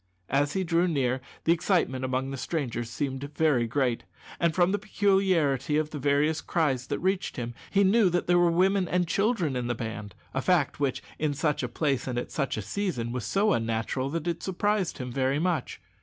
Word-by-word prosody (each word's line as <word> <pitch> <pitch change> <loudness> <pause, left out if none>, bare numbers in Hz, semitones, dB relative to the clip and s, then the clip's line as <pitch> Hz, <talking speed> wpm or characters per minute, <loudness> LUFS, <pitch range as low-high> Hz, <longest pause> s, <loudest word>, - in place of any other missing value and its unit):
As 140 +2 +2
he 190 - 0
drew 170 +1 +2
near 130 -5 0 0.2
the 165 - +3
excitement 165 -7 0
among 130 +1 -1
the - - -3
strangers 125 -5 -3
seemed 135 +2 -3
very 145 -7 +2
great, 125 -1 0 0.4
and, 170 -2 +1
from 180 0 +3
the 205 - 0
peculiarity 185 - +2
of 155 0 -1
the 150 - -5
various 145 +3 +2
cries 135 -6 0
that 145 - -1
reached 190 +1 -1
him, 120 -1 -4 0.2
he 200 0 +3
knew 200 0 +4
that 175 0 0
there 175 0 +4
were 175 -1 +4
women 185 +2 +2
and 180 0 +1
children 195 - +1
in 125 -1 -2
the 120 - -1
band 110 -3 -6 0.2
a 130 - 0
fact 170 -3 +1
which, 140 -3 -1 0.2
in 150 -2 0
such 150 0 0
a - - -1
place 140 -5 -1
and 125 -2 -2
at 120 - -3
such 140 -6 -1
a 110 - -3
season, 120 - -2
was 125 -2 -3
so 205 +1 +2
unnatural 115 +4 -1
that 165 +2 -3
it 170 -1 -2
surprised 195 0 0
him 125 -2 -5
very 135 +2 +1
much. 165 -4 -1
150 Hz, 205 wpm, -27 LUFS, 130-180 Hz, 0.4 s, knew